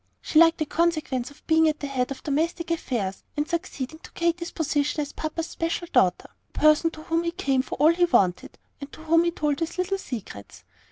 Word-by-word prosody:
She 310 - +2
liked 330 0 +6
the 310 - -1
consequence 305 -6 0
of 285 - -19
being 320 0 +4
at 305 - -3
the - - -4
head 260 -3 -1
of 275 - -7
domestic 330 +4 -1
affairs, 225 - -2
and 295 +1 0
succeeding 315 -3 -4
to - - -14
Katy's 340 0 -1
position 295 -1 -1
as 290 -1 -3
papa's 315 +1 -3
special 335 +1 -3
daughter, 180 -1 +2 0.2
the - - -8
person 305 +2 +5
to 310 -1 -11
whom 330 +1 0
he 340 - -1
came 280 -7 0
for 260 - -6
all 310 +4 +5
he 350 +1 +3
wanted, 185 - +1 0.2
and 280 0 -8
to 315 - -11
whom 330 +1 +3
he - - +3
told 300 -3 -1
his 330 +1 -3
little 380 +2 -1
secrets. 200 - -8
310 Hz, 215 wpm, -25 LUFS, 280-335 Hz, 0.2 s, liked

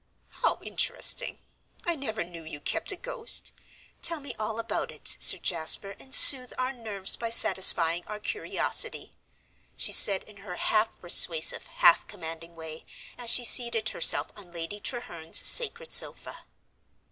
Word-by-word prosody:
"How - - -1
interesting! - - -2 0.5
I 345 - -2
never 225 - -7
knew 170 -1 -14
you 155 -2 -10
kept 330 - -3
a - - -6
ghost. - - -3 0.5
Tell 335 -2 -4
me 280 - -11
all 215 +1 -6
about 230 - -6
it, - - -9
Sir - - +5
Jasper, 175 +4 -2
and 265 - -5
soothe 255 -3 +9
our 255 +1 -5
nerves 210 -6 -2
by 230 - -7
satisfying 175 -5 +1
our 210 0 -9
curiosity," 425 - -3 0.6
she - - -1
said 195 -2 +6
in 210 -1 -20
her 195 -3 -11
half 220 +3 -3
persuasive, 170 -2 +1
half 170 - +1
commanding 165 0 -12
way, 160 -1 -12 0.3
as 240 -1 -6
she 245 - +2
seated 235 -2 +2
herself - - 0
on 190 -4 -17
Lady 170 +4 -8
Treherne's 175 -10 -6
sacred 485 0 0
sofa. - - 0
215 Hz, 145 wpm, -24 LUFS, 170-255 Hz, 0.6 s, soothe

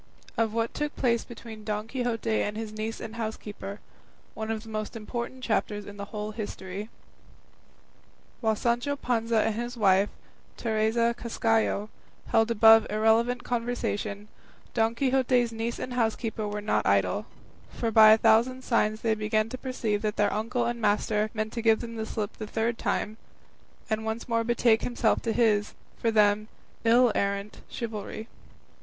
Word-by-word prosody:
OF 225 -1 +1
WHAT 230 +1 -1
TOOK 295 0 -3
PLACE 235 -3 +1
BETWEEN 225 -2 -10
DON 210 0 -3
QUIXOTE 230 -3 -1
AND 210 +1 -2
HIS 220 -1 -5
NIECE 215 +1 -4
AND 225 +1 -7
HOUSEKEEPER; 210 -2 -5 0.5
ONE 220 0 -5
OF 220 -1 -2
THE 225 - -11
MOST 215 +1 -4
IMPORTANT 240 +3 -5
CHAPTERS 210 -3 -1
IN 205 0 -10
THE 200 - -5
WHOLE 210 0 -5
HISTORY 205 -1 -6 1.5
While 220 -2 +1
Sancho 240 +6 0
Panza 230 -4 +1
and 220 - +1
his 240 +2 -4
wife, 195 -1 +4 0.5
Teresa 225 +1 +1
Cascajo, 225 -3 0 0.4
held 225 0 +4
the 235 - 0
above 225 0 +7
irrelevant 225 +3 +2
conversation, 220 -4 -2 0.5
Don 225 0 +2
Quixote's 255 -2 +2
niece 230 +1 -3
and 255 - -5
housekeeper 225 -2 -1
were 210 0 -3
not 210 - 0
idle, 95 -2 +2 0.4
for 230 - -2
by 220 0 +8
a 220 - +7
thousand 230 +4 +3
signs 215 -3 +1
they 225 -1 +2
began 215 0 0
to 255 - -5
perceive 230 -6 -2
that 210 -1 -1
their 205 -1 +2
uncle 230 +3 -1
and 235 0 -2
master 210 0 +1
meant 215 0 -2
to 235 - -3
give 225 -1 +4
them 230 -1 -6
the 220 -1 -4
slip 210 -2 -4
the 215 - -6
third 230 +2 -1
time, 215 +1 -1 0.7
and 220 -1 -1
once 220 +1 -3
more 230 -1 +1
betake 235 -1 +3
himself 240 -2 +1
to 230 - -1
his, 215 -3 +2 0.2
for 230 - +1
them, 210 -1 +3 0.4
ill 235 +1 +5
errant 200 +1 -2
chivalry. 220 -1 -5
225 Hz, 160 wpm, -27 LUFS, 215-235 Hz, 1.5 s, by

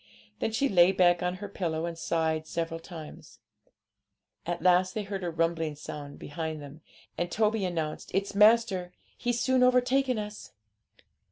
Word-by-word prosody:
Then - - -1
she 245 +6 +1
lay 180 -4 +5
back 175 -2 +3
on 180 0 -1
her 205 +2 -7
pillow 170 -5 -2
and 170 -1 -4
sighed 160 -1 -1
several 165 -1 -3
times. 165 -2 -11 1.1
At 170 -1 -3
last 185 0 +4
they 215 - -1
heard 195 -1 -5
a 175 - -1
rumbling 165 -2 -1
sound 145 -1 -8
behind 160 +1 -5
them, 145 +2 -11 0.4
and 175 - -1
Toby 215 0 +1
announced, 160 -4 -3
'It's 195 +2 -1
master; 210 -4 +4 0.2
he's 240 -1 -1
soon 260 +1 +2
overtaken 255 0 +3
us.' 210 0 -7
180 Hz, 155 wpm, -28 LUFS, 165-210 Hz, 1.1 s, lay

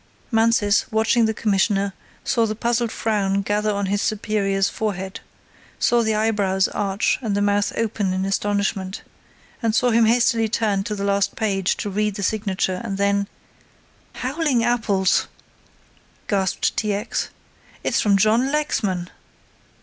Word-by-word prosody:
Mansus, 225 -2 +2
watching 220 +1 +3
the 220 - 0
Commissioner, 200 -1 +1 0.3
saw 230 -3 +1
the 215 - -3
puzzled 235 0 0
frown 200 -3 0
gather 210 +1 0
on 200 -1 -1
his 200 +1 0
superior's 200 -2 0
forehead, 190 -3 -4 0.6
saw 240 0 +3
the 220 -1 +1
eyebrows 205 -3 +1
arch 200 0 0
and 215 -5 -1
the - - +1
mouth 205 0 +1
open 215 -4 -1
in 185 +1 -1
astonishment, 195 -1 -1 0.7
saw 245 +2 +2
him 225 0 +4
hastily 230 -1 +3
turn 210 -3 0
to 210 - -3
the 200 - -4
last 200 -1 +1
page 195 -4 0
to 210 - -4
read 210 0 0
the 200 - -4
signature 190 -3 -1
and 195 -4 -4
then: 200 0 +1 0.9
"Howling 270 -2 0
apples!" 215 -6 +1 1.0
gasped 190 -3 0
T. 210 -1 0
X. 205 +3 -2 0.5
"It's - - +1
from 200 -2 +3
John 225 +7 +3
Lexman!" 205 -12 -1
210 Hz, 140 wpm, -22 LUFS, 195-225 Hz, 1.0 s, him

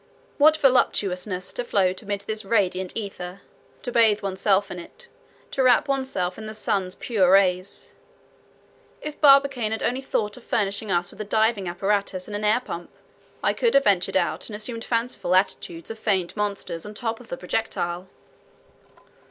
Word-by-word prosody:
What 310 +2 +6
voluptuousness 195 -9 +1
to 245 - -2
float 190 -5 +1
amid 205 -2 -3
this 215 +1 -4
radiant 190 -3 0
ether, 195 -3 -6 0.4
to 245 - -3
bathe 220 -4 +4
oneself 195 +1 +1
in 180 - -5
it, 475 - -13 0.4
to 270 - 0
wrap 255 +2 +4
oneself 260 -10 -1
in 215 - -7
the 215 - -6
sun's 195 -3 -1
pure 200 -7 +1
rays. 185 0 +2 1.1
If 300 -1 -7
Barbicane 275 -6 +5
had 220 - -2
only 255 +2 0
thought 210 -5 -2
of 250 - -13
furnishing 205 -1 0
us 175 0 0
with 215 - -9
a - - -1
diving 215 -1 +1
apparatus 195 +1 -1
and 205 - -6
an 205 - -3
air 215 +4 +3
pump, 175 -7 -7 0.5
I - - +3
could 470 - +1
have 275 - +6
ventured 190 -4 +2
out 175 +4 -1
and 210 - -6
assumed 230 +2 -5
fanciful 230 -6 0
attitudes 175 -2 -1
of 225 - -8
feigned 190 -5 0
monsters 200 -5 -3
on 210 - -7
the - - -7
top 225 -1 -2
of 245 - -14
the 175 - -5
projectile." 180 -2 -3
205 Hz, 170 wpm, -24 LUFS, 185-230 Hz, 1.1 s, What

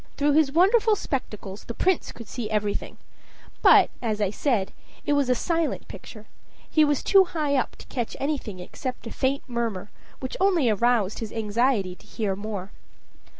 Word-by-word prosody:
Through 290 0 +3
his 295 -1 +4
wonderful 420 - +4
spectacles 210 - -5
the 235 - -6
Prince 375 -2 +1
could 230 - -11
see 230 -2 -5
everything; 210 -1 -2 0.6
but, - - +7
as 220 -3 -1
I 200 -2 +1
said, 215 -5 0 0.3
it 290 - +2
was 285 -3 +2
a 250 - +4
silent 330 +4 -1
picture; 215 -2 -11 0.4
he 310 - +4
was 290 -2 +1
too 390 -1 +6
high 300 -5 -1
up 260 - 0
to - - -13
catch 240 -4 -4
anything 270 -9 -3
except 250 +9 -6
a 225 - -6
faint 270 +1 0
murmur, 230 -5 -3 0.3
which 260 - -5
only 355 - +3
aroused 220 -2 +1
his 225 -2 -5
anxiety 220 -2 +1
to - - -18
hear 205 -4 -2
more. 200 -1 -5
245 Hz, 170 wpm, -25 LUFS, 210-290 Hz, 0.6 s, but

